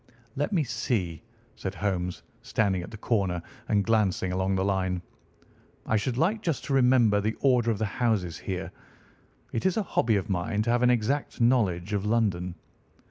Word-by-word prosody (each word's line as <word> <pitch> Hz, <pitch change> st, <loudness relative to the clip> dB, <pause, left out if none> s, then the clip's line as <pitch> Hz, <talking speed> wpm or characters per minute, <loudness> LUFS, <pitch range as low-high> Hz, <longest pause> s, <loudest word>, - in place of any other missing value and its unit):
"Let 145 Hz, +7 st, -1 dB
me 175 Hz, -6 st, +2 dB
see," 110 Hz, -, -2 dB, 0.3 s
said 95 Hz, 0 st, -5 dB
Holmes, 90 Hz, -3 st, -2 dB, 0.2 s
standing 100 Hz, -4 st, 0 dB
at 85 Hz, -, -8 dB
the 110 Hz, -, -9 dB
corner 100 Hz, -6 st, 0 dB, 0.3 s
and 100 Hz, -2 st, +2 dB
glancing 100 Hz, -5 st, +1 dB
along 95 Hz, +1 st, 0 dB
the 95 Hz, 0 st, 0 dB
line, 95 Hz, -2 st, 0 dB, 0.8 s
"I -, -, +1 dB
should 120 Hz, +3 st, 0 dB
like 200 Hz, -, +1 dB
just 165 Hz, -8 st, -1 dB
to 140 Hz, -, -2 dB
remember 125 Hz, -6 st, +4 dB
the 110 Hz, +2 st, -1 dB
order 125 Hz, -4 st, +3 dB
of 110 Hz, -, +1 dB
the 110 Hz, -, 0 dB
houses 100 Hz, -6 st, -1 dB
here. 95 Hz, -2 st, -4 dB, 0.8 s
It 115 Hz, -, -1 dB
is 190 Hz, -, 0 dB
a 220 Hz, -, +1 dB
hobby 115 Hz, -, +1 dB
of 100 Hz, +1 st, -1 dB
mine 100 Hz, +2 st, -1 dB
to 115 Hz, -, 0 dB
have 120 Hz, 0 st, +2 dB
an 125 Hz, -, +5 dB
exact 125 Hz, +5 st, 0 dB
knowledge 105 Hz, -6 st, +2 dB
of 100 Hz, -1 st, 0 dB
London. 95 Hz, -6 st, 0 dB
105 Hz, 180 wpm, -27 LUFS, 95-120 Hz, 0.8 s, an